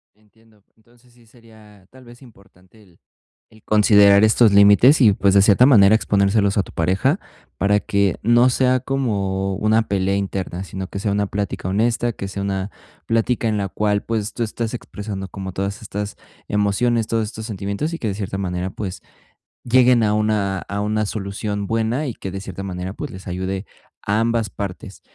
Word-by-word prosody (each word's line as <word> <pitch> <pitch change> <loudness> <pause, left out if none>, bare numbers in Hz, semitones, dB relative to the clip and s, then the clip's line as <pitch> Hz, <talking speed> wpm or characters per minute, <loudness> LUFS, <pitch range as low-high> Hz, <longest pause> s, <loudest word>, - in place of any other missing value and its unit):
Entiendo. 110 0 -28
Entonces, 120 +2 -27
sí 120 -1 -24
sería, 110 -4 -20
tal 130 -1 -17
vez, 120 +2 -16
importante 100 -3 -20
el 90 -5 -24 0.5
el 110 -1 -21
considerar 105 -1 +5
estos 110 0 +4
límites 100 +9 +6
y, 110 -6 +6
pues, 100 0 +2
de 100 - +6
cierta 105 +5 +5
manera, 110 -5 +6
exponérselos 100 -1 +1
a 100 - +3
tu - - -13
pareja 90 +4 0 0.4
para 105 +1 +2
que 100 -3 0
no 120 +3 +4
sea 130 0 +2
como 100 -8 -2
una 110 +2 +1
pelea 95 0 0
interna, 95 -2 -3
sino 95 0 -6
que 100 - -7
sea 105 0 -1
una 100 0 0
plática 100 -2 -4
honesta, 115 +4 0
que 100 - -7
sea 100 0 -5
una 95 0 -3 0.4
plática 115 0 0
en 105 - 0
la 100 -1 -2
cual, 105 +1 -1
pues, 110 -2 -3
tú 120 - -1
estás 115 +1 -4
expresando 105 -5 -6
como 95 +1 -7
todas 100 +3 -4
estas 105 0 -5 0.3
emociones, 105 +3 0
todos 115 -1 0
estos 110 +1 -8
sentimientos 100 - -4
y 165 - -4
que, 115 - -4
de 100 - -1
cierta 95 -1 -5
manera, 90 -1 -3
pues 95 -1 -6 0.6
lleguen 125 0 +4
a 105 -1 +2
una 105 -2 0
a 100 +2 -5
una 105 0 -1
solución 100 0 -4
buena 115 +6 -1
y 125 - -3
que 95 - -7
de 95 - -5
cierta 95 0 -7
manera, 95 0 -5
pues, 145 +4 -7
les 95 - -11
ayude 95 +2 -4 0.4
a 105 +2 0
ambas 115 -1 0
partes. 100 0 -7
105 Hz, 185 wpm, -20 LUFS, 100-115 Hz, 0.6 s, límites